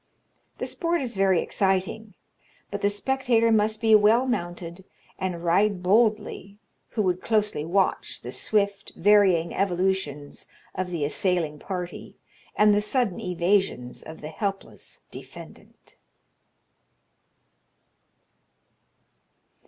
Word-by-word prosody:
The - - -3
sport 340 0 -1
is 245 -2 -4
very 190 -3 +3
exciting; 195 +2 -1 0.6
but 200 0 -4
the 200 - +3
spectator 230 +1 +1
must 215 0 +2
be 220 -1 +3
well 215 +4 +5
mounted, 175 -6 -4 0.4
and 180 -3 -3
ride 185 +2 +2
boldly, 210 0 +1 0.4
who 215 - +3
would 185 -1 0
closely 210 -8 0
watch 185 +4 -1
the - - -6
swift, 200 -2 -1
varying 190 -4 +4
evolutions 180 -6 -2 0.3
of 185 0 -3
the 165 -5 -2
assailing 165 -2 -1
party, 180 -1 -6 0.4
and 210 0 +5
the 205 - +2
sudden 215 -2 -1
evasions 180 -7 0
of 160 - -11
the 150 - -6
helpless 195 +3 -5
defendant." - - -13
195 Hz, 105 wpm, -25 LUFS, 175-215 Hz, 0.6 s, well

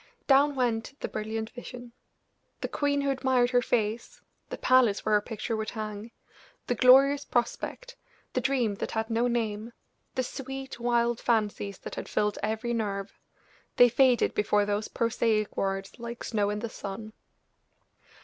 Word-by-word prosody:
Down 280 +1 +4
went 245 +1 -1
the - - -2
brilliant 220 +1 -4
vision! 245 -1 -9 0.7
The - - -1
queen 285 -1 0
who 280 0 +1
admired 260 -2 +2
her 245 -1 +4
face, 230 -1 -1 0.3
the - - -5
palace 250 -5 +3
where 215 - +2
her 210 - +5
picture 225 +1 -4
would 220 0 -3
hang, 215 0 -6 0.6
the - - 0
glorious 270 +4 +6
prospect, 385 - -2 0.4
the - - 0
dream 250 -6 +1
that - - -3
had 220 +1 -2
no 230 +2 +2
name, 225 -1 -2 0.4
the 260 - +1
sweet, 270 0 -6
wild 235 0 +1
fancies 210 -4 0
that - - -9
had - - -6
filled 210 0 0
every 220 +2 -1
nerve 200 -3 -3 0.6
they 245 - +7
faded 250 0 +3
before 210 0 +2
those 205 +1 -1
prosaic 225 -2 0
words 195 +3 -2
like 235 0 -6
snow 210 -3 0
in 210 - -2
the 230 +2 -3
sun! 215 +1 -7
235 Hz, 155 wpm, -28 LUFS, 215-250 Hz, 0.7 s, they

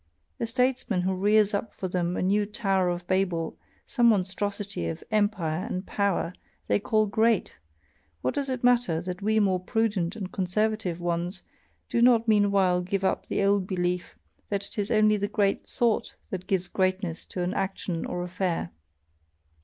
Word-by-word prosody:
A 230 - -1
statesman 250 -4 +1
who 190 +1 0
rears 210 +2 +3
up 205 +2 -3
for 190 - -3
them 180 -1 -1
a - - 0
new 205 +2 +2
Tower 195 -4 +1
of 175 0 -3
Babel, 180 -3 0 0.3
some 240 -2 +3
monstrosity 200 - 0
of 80 -1 -5
empire 195 -6 +1
and 195 -4 -4
power, 200 -4 0 0.3
they - - +2
call 215 +1 +2
'great' 220 +1 +2 0.7
what 130 - +1
does 275 -1 -2
it 255 -2 -3
matter 240 -9 +3
that 180 +1 -5
we 220 +2 +2
more 190 -3 +2
prudent 200 -2 0
and 190 -4 -5
conservative 195 -1 -1
ones 175 +2 -2 0.4
do 235 - 0
not 235 -1 +5
meanwhile 200 -4 +3
give 190 +2 -2
up 190 - 0
the - - 0
old 200 -1 +2
belief 180 - -2 0.3
that 200 -1 -1
it - - -7
is 205 - -1
only 215 -2 +4
the 205 0 -1
great 205 -1 0
thought 235 -3 0 0.2
that 185 -1 -5
gives 185 -2 0
greatness 185 -2 -1
to 180 - -3
an 180 +2 -1
action 190 -3 -2
or 175 - -3
affair. 180 - -2
195 Hz, 170 wpm, -27 LUFS, 180-215 Hz, 0.7 s, not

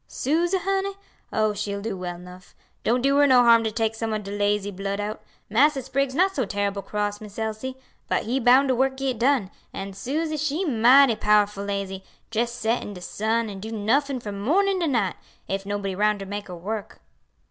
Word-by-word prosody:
"Suse, 340 +6 0
honey? 390 +1 -1 0.4
oh, 215 -1 +1
she'll 200 0 -3
do 210 0 -4
well 180 -1 -5
'nuff; 180 0 -13 0.3
don't 245 +2 +1
do 275 +1 +3
her 290 0 +6
no 255 -2 +6
harm 230 -1 +6
to 220 - -1
take 225 0 0
some 225 0 -3
ob 210 - -4
de 200 - -7
lazy 205 0 0
blood 195 +1 -4
out. 210 +1 -4 0.3
Massa 270 +5 +3
Spriggs 265 +1 -1
not 375 +4 +3
so 265 - +1
terrible 200 -1 -2
cross, 205 +1 -3
Miss 210 -1 -11
Elsie; 220 +4 -4 0.3
but - - +1
he 250 +4 -1
bound 260 +3 +5
de - - +4
work 265 +1 +1
git 265 -4 -2
done, 245 -6 +2 0.2
an' 195 0 -5
Suse 300 +9 -2
she 305 +5 -1
mighty 250 -1 +6
powerful 210 -1 +2
lazy, 195 -1 -4 0.3
jes' 235 +1 0
set 230 0 -1
in 205 - -7
de 180 - -9
sun 220 +5 -1
an' 200 -2 -7
do 220 +3 -7
nuffin' 255 +6 0
from 205 -4 -6
mornin' 380 - +2
to 340 - 0
night, 225 - 0 0.3
ef 195 +1 -3
nobody 200 -1 -2
roun' 210 +2 +2
to 195 - -7
make 205 +1 -5
her 180 - -7
work." 205 +4 -5
220 Hz, 205 wpm, -24 LUFS, 200-265 Hz, 0.4 s, her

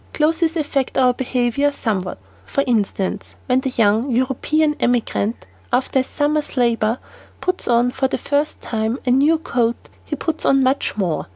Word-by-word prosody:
Clothes 320 +2 +2
affect 285 -4 -1
our 255 -1 +4
behavior 250 +2 0
somewhat. 195 -9 -2 0.3
For 275 - -1
instance, 205 -4 -1
"When 255 0 +2
the 265 - -2
young 225 +1 +2
European 270 +5 +1
emigrant, 235 -2 0 0.3
after 255 +2 +1
a - - +2
summer's 295 +1 -1
labor 230 -2 +2 0.4
puts 365 0 -2
on 240 +1 +3
for 265 +1 0
the - - -2
first 290 +1 -1
time 220 +1 -2
a 250 - +2
new 290 +6 +4
coat, 240 -8 -1
he - - -4
puts 320 -1 -3
on 270 -1 +4
much 260 -3 0
more. 180 -6 -1
255 Hz, 160 wpm, -20 LUFS, 235-285 Hz, 0.4 s, our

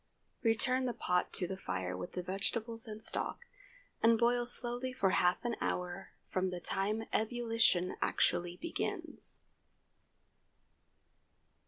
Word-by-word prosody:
Return 255 +3 +3
the 245 - -1
pot 180 0 +1
to 180 - +1
the 190 - -3
fire 90 - -3
with 90 -1 -6
the 180 - -3
vegetables 225 +5 -1
and 215 0 -6
stock, 225 - +1 0.6
and 230 0 +6
boil 240 +1 +3
slowly 245 +1 0
for 195 -6 +2
half 180 +6 +2
an 235 -1 0
hour 180 +1 -3
from 185 0 0
the 180 -1 -4
time 205 +5 0
ebullition 225 -5 +2
actually 175 0 +1
begins. 335 - -4
215 Hz, 125 wpm, -34 LUFS, 180-240 Hz, 0.6 s, and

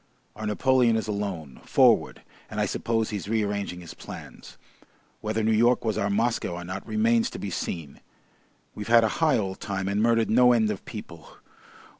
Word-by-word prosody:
Our 110 0 -5
Napoleon 125 +2 +3
is 110 -1 -1
alone, 100 -9 -4
forward, - - +3 0.3
and - - -5
I - - +2
suppose 115 -1 -1
he's 100 -2 -4
rearranging 100 -4 -1
his 85 - -10
plans. - - -11 0.6
Whether 110 +1 -2
New 110 - +2
York 120 +3 +3
was 110 - 0
our 100 - 0
Moscow 110 -3 0
or 90 - -6
not 95 +2 -6
remains 230 +2 +2
to - - -8
be 100 - -5
seen. 80 -4 -5 0.7
We've 105 - -7
had 115 0 +6
a - - +3
high 155 -5 +4
old 95 -3 -3
time 95 -1 -3
and 100 +1 0
murdered 115 -1 +2
no 125 +2 +6
end 110 -2 +2
of 100 - -6
people! 85 -7 -10
110 Hz, 180 wpm, -26 LUFS, 100-115 Hz, 0.7 s, had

